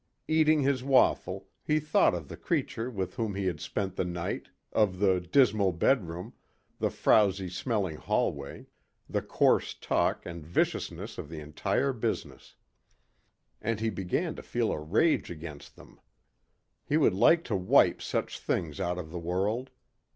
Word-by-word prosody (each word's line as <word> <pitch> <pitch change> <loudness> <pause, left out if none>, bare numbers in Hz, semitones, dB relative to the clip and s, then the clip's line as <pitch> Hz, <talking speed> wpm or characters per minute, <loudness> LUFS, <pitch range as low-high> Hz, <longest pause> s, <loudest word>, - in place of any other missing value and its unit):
Eating 155 -1 +4
his 135 -2 +1
waffle, 135 -1 +2 0.2
he 155 0 +2
thought 150 -10 +3
of 80 -4 -6
the - - -8
creature 115 +3 -2
with 95 -7 -4
whom 110 -4 -2
he 100 -1 -2
had 85 -5 -1
spent 95 -2 -3
the - - +1
night, 85 -1 -4 0.3
of 100 -4 +2
the 95 -1 +3
dismal 100 0 +3
bedroom, 90 +1 0 0.5
the - - +1
frowsy 100 -3 +3
smelling 95 - -2
hallway, 70 -2 -2 0.4
the - - -1
coarse - - +2
talk - - 0
and 85 -2 -7
viciousness 80 +3 -2
of 75 - -7
the 80 -1 -7
entire 75 - -1
business. 115 - -4 1.1
And 110 0 -1
he 110 0 0
began 95 -2 -2
to - - -6
feel - - -1
a - - -2
rage 100 - +2
against 80 -3 -9
them. - - -17 0.8
He 150 - +1
would 145 -10 +4
like 165 - +5
to 110 - -2
wipe 95 -1 +4
such - - -3
things 80 -2 -2
out 90 -2 -1
of 80 -3 -6
the 85 - -4
world. 100 +9 -1
95 Hz, 155 wpm, -29 LUFS, 85-115 Hz, 1.1 s, like